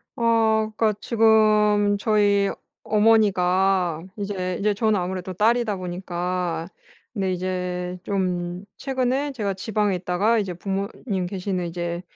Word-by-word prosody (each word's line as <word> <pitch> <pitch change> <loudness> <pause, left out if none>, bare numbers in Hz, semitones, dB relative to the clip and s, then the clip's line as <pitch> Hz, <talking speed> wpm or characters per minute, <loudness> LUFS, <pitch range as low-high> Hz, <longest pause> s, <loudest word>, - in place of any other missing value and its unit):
어 220 -2 +2
그러니까 215 -1 +2
지금 215 -2 +3
저희 205 -2 +3 0.3
어머니가 190 -5 +2
이제 185 -3 -3
이제 210 +1 +2
저는 215 -1 +1
아무래도 185 +1 -4
딸이다 220 +2 +2
보니까 180 -1 -3 0.5
근데 195 -4 -1
이제 180 0 -3
좀 180 -2 -2
최근에 265 +1 -1
제가 205 -7 -2
지방에 205 0 -1
있다가 190 +6 +1
이제 195 -4 -3
부모님 195 +1 -3
계시는 185 -1 -3
이제 175 0 -4
195 Hz, 270 characters per minute, -23 LUFS, 180-215 Hz, 0.5 s, 지금